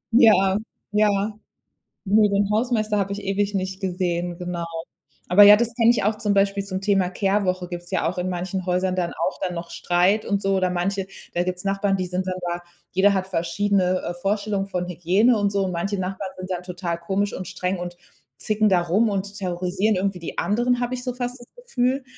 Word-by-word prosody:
Ja, 195 -5 +6 0.3
ja. 210 0 +4 1.0
Nö, 210 +1 +4
den 200 0 +1
Hausmeister 215 -2 +1
habe 195 0 -1
ich 205 - -4
ewig 200 +1 0
nicht 190 0 -3
gesehen, 175 -2 -2
genau. 175 -1 -4 0.7
Aber 190 +4 +8
ja, 205 +1 +10
das 235 +1 -1
kenne 230 -1 +5
ich 240 - 0
auch 210 +2 +2
zum 210 -1 0
Beispiel 200 0 +2
zum 190 -1 -4
Thema 195 -2 +2
Kehrwoche, 185 -1 0
gibt's 175 0 -8
ja 185 - +1
auch 180 - -6
in 180 +1 -1
manchen 185 +1 -3
Häusern 185 0 0
dann 175 -2 -1
auch 170 +3 -2
dann 180 - -3
noch 170 0 -6
Streit 180 +5 +1
und 200 -1 0
so 195 0 +1
oder 185 -1 +1
manche 190 +2 -1 0.3
da 175 - +1
gibt's 180 0 -4
Nachbarn, 195 0 +1
die 185 -1 -2
sind 180 +1 -2
dann 185 -1 -2
da 175 0 -4 0.3
jeder 200 +2 +4
hat 190 -1 -1
verschiedene, 185 +1 +1
äh, 175 - -3
Vorstellungen 200 +2 -1
von 180 -2 -3
Hygiene 190 +7 +3
und 205 -1 +1
so. 200 -1 +1
Und 185 - -2
manche 195 +3 -2
Nachbarn 190 +1 -4
sind 185 0 -7
dann 180 -1 -3
total 180 -2 -4
komisch 195 +4 -1
und 185 - -6
streng 185 0 -2
und 175 0 -6 0.4
zicken 215 0 +1
da 185 -2 +4
rum 195 +7 +2
und 200 0 -3
terrorisieren 185 +3 0
irgendwie 190 0 -1
die 170 - -7
anderen, 240 +4 +1
habe 245 +1 -1
ich 250 - -7
so 250 -1 -2
fast 245 +1 -4
das 240 - -14 0.2
Gefühl. 260 - 0
195 Hz, 210 wpm, -23 LUFS, 180-205 Hz, 1.0 s, ja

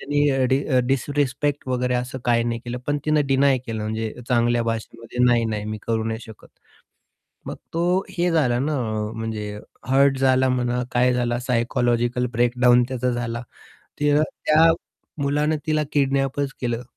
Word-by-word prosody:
तिनी 145 +1 +1
अ, 135 -1 +1
डि 135 +1 +3 0.3
डिसरेस्पेक्ट 140 +1 -1
वगैरे 125 0 0
असं 125 +1 -3
काही 120 -1 +2
नाही 115 -1 -2
केलं. 120 +1 -4
पण 145 0 0
तिने 150 -1 +3
डीनाय 135 0 +4
केलं. 110 -2 -4
म्हणजे 110 0 -3 0.2
चांगल्या 120 -1 +2
भाषेमध्ये 115 +1 -2
नाही-नाही 115 -4 +1
मी 110 0 -4
करू 115 -1 0
नाही 110 0 -3
शकत. 110 -1 -13 1.0
मग - - -5 0.2
तो 165 - -1 0.3
हे 180 -1 0
झाला 135 -8 +2
ना 145 +4 -1
आ, 110 -4 -2
म्हणजे 110 -2 -5 0.3
हर्ट 135 0 +4
झाला 130 0 +3
म्हणा 125 -1 0
काय 125 +1 +3
झाला 120 -1 0
सायकॉलॉजिकल 120 0 +1
ब्रेकडाउन 120 +1 +4
त्याचा 125 -1 -1
झाला, 120 0 -3 0.6
तर 145 0 +3 0.2
त्या 160 +2 +6 0.5
मुलाने 150 +2 +1
तिला 155 -1 +1
किडनॅपच 135 0 0
केलं. 120 -1 -2
125 Hz, 150 wpm, -23 LUFS, 115-140 Hz, 1.0 s, त्या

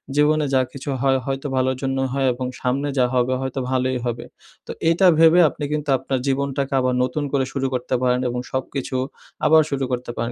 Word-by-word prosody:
জীবনে 150 +1 +3
যা 130 - +4
কিছু 140 +1 -7
হয়, 135 -1 +3
হয়তো 135 +1 -3
ভালোর 130 0 +1
জন্যই 135 -1 -1
হয় 135 -1 +1
এবং 125 +1 -4
সামনে 135 +3 0
যা 125 - +4
হবে, 125 +1 +2
হয়তো 130 0 -3
ভালোই 130 0 0
হবে। 120 -1 -3 0.4
তো, - - -5 0.2
এটা 185 +3 +3
ভেবে 165 +2 +6
আপনি - - -8
কিন্তু 150 -1 -2
আপনার 130 +1 -2
জীবনটাকে 140 0 -1
আবার 130 0 +1
নতুন 135 +4 -2
করে 135 -2 +2
শুরু 135 -1 -1
করতে 125 +1 -1
পারেন, 125 0 +2
এবং 125 - -3
সবকিছু 130 0 -3 0.5
আবার 160 +1 +6
শুরু 140 -1 -2
করতে 125 -1 -3
পারেন। 115 +1 -2
135 Hz, 200 wpm, -22 LUFS, 130-140 Hz, 0.5 s, ভেবে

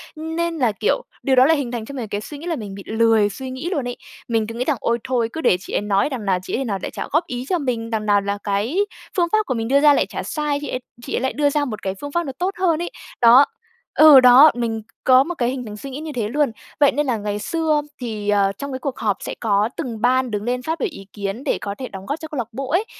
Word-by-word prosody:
Nên 325 +1 -3
là 245 -6 +2
kiểu, - - 0 0.2
điều 270 -2 +3
đó 255 +1 +7
lại 320 0 +4
hình 255 -4 -3
thành 230 -2 -4
cho 280 - -9
mình 235 -4 -4
cái 205 +1 -3
suy 290 +6 -8
nghĩ 330 - -8
là 335 - 0
mình 205 -5 -7
bị 195 - -9
lười 220 -2 +3
suy 260 +5 -7
nghĩ 265 +7 -4
luôn 285 -9 -2
ấy. 245 - -5 0.3
Mình 225 -2 0
cứ 230 - -7
nghĩ 250 +2 -2
rằng: 295 -4 +1
"Ôi, 235 0 0
thôi 240 -3 0
cứ 320 - -4
để 180 - +3
chị - - -9
ấy - - +1
nói, 205 +6 +1
đằng 245 -6 -5
nào 190 -2 +2
chị - - -3
ấy 270 - -2
nào 200 -4 -2
lại - - -4
chả - - -5
góp 325 +4 +1
ý 245 0 -4
cho 360 -2 +1
mình? 235 -5 -2
Đằng 220 -2 -2
nào 205 -1 +3
là 200 0 -2
cái 210 - -1 0.4
phương 345 - +3
pháp 430 0 +3
của 260 - -1
mình 225 -1 -2
đưa 280 +2 +4
ra 295 -1 +7
lại - - +2
chả - - -6
sai? 300 -2 -1
Chị 290 - -5
ấy 255 - -2 0.3
chị - - -6
ấy - - -1
lại 260 - -1
đưa 290 0 +2
ra 290 0 0
một 215 -5 -5
cái 190 0 -2
phương 285 0 -6
pháp 345 +2 0
nó 270 - -4
tốt 365 +2 0
hơn" 340 -3 +2
ấy. 350 - -4 0.3
Đó 240 +4 +8 0.5
ừ, 305 -3 +9
đó, 255 +4 +8
mình 225 -2 -2 0.2
có 255 0 +7
một 350 +2 -5
cái 245 -4 0
hình 255 -2 -4
thành 210 -1 -8
suy 275 - -8
nghĩ 270 +2 -6
như 310 -1 -6
thế 215 -3 -1
luôn. 290 -1 +1 0.3
Vậy 285 0 +6
nên 295 +1 0
là 240 -3 +1
ngày 205 0 -3
xưa 310 +4 0 0.2
thì, 215 -4 -4
ờ, 200 -1 +3
trong 280 +3 -5
cái 260 - -4
cuộc 275 -1 -4
họp 205 -3 0
sẽ - - -6
có 210 -1 +2
từng 240 -8 -5
ban 255 0 +2
đứng 210 0 -2
lên 250 +1 -1
phát 320 +4 -3
biểu 455 - 0
ý 195 -9 -11
kiến 205 +5 -4
để - - 0
có 200 -1 -4
thể 255 - -4
đóng 195 0 -9
góp 285 +3 -3
cho 315 - -7
câu 305 -3 -7
lạc 235 -3 -2
bộ 265 +3 -5
ấy. 380 +6 +2
255 Hz, 305 wpm, -21 LUFS, 220-295 Hz, 0.5 s, ừ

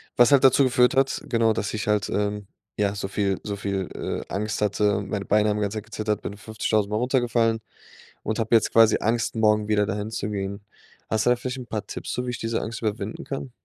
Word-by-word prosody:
was 120 +2 +5
halt 140 - +6
dazu 135 +1 +6
geführt 125 0 +3
hat 135 0 +2
genau, 115 -2 +2
dass 105 -1 -3
ich 105 -1 -3
halt, 105 -1 +1
ähm, 105 -1 -2 0.3
ja, 100 -1 +1
so 95 - -3
viel 100 -1 -1
so 105 -2 -3
viel, 100 -2 -3
äh, - - -5
Angst 105 +2 -2
hatte. 105 -1 +1
Meine 100 0 -4
Beine 105 0 +3
haben 105 - 0
die 105 - -2
ganze 105 +1 -2
Zeit 105 - -6
gezittert, 110 -1 -2
bin 100 - -6
50.000 105 -1 -1
Mal 105 - -1
runtergefallen 120 -2 +1 0.6
und 110 - -2
habe 115 +1 -1
jetzt 110 - +3
quasi 115 -1 +6
Angst, 115 +1 0
morgen 105 -1 +3
wieder 105 -1 +2
dahin 105 +2 -3
zu 105 - -3
gehen. 100 0 -4 0.5
Hast 110 -1 +1
du - - +4
da 125 - +5
vielleicht 125 +2 -4
'n 125 -2 -8
paar 105 -3 -4
Tipps - - -6
so, 125 - -2
wie 125 - -2
ich 120 - -5
diese 115 0 -1
Angst 110 0 -5
überwinden 110 -1 -3
kann? 135 -1 -5
110 Hz, 235 wpm, -24 LUFS, 105-115 Hz, 0.6 s, halt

